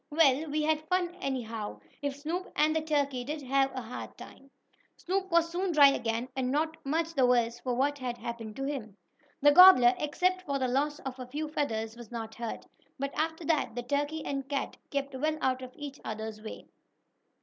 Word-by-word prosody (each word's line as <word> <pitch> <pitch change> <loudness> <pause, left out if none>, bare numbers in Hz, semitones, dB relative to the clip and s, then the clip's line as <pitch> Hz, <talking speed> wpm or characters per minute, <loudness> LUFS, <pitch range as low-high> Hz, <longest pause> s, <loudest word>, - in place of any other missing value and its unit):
"Well, 300 -1 +3
we 305 +1 0
had 310 0 0
fun 360 -1 0
anyhow, 225 - -4 0.2
if 285 -1 -2
Snoop 330 +6 -4
and 310 +1 +3
the 320 - +2
turkey 285 -5 0
did 295 +3 -5
have 270 +1 +2
a 255 - -4
hard 230 +2 -8
time." 275 - -13 0.5
Snoop 380 +1 -2
was 335 -1 +3
soon 360 +1 -1
dry 285 -2 +8
again, 230 -2 -1
and 260 -1 -1
not 310 +4 0
much 325 +4 -1
the 265 -5 +3
worse 240 -1 +2
for 250 0 -2
what 285 +3 +1
had 245 -2 -3
happened 230 -3 -6
to 270 - -4
him. 250 -8 -4 0.5
The 290 - +8
gobbler, 290 -8 +9
except 365 +5 +1
for 280 -6 -2
the 260 -1 0
loss 290 +4 0
of 265 -1 -6
a 255 - -6
few 300 +4 -4
feathers, 225 -7 -2
was 235 -2 -11
not 225 -2 -5
hurt. 235 -1 -6 0.3
But 275 0 -3
after 320 +1 -2
that 295 -7 +1
the 245 - -3
turkey 290 +4 -1
and 275 -1 -3
cat 280 -2 -2
kept 280 -1 -2
well 305 +4 -1
out 260 0 0
of 255 -1 -8
each 290 -1 -8
other's 220 0 -5
way. 215 - -8
275 Hz, 200 wpm, -30 LUFS, 245-310 Hz, 0.5 s, gobbler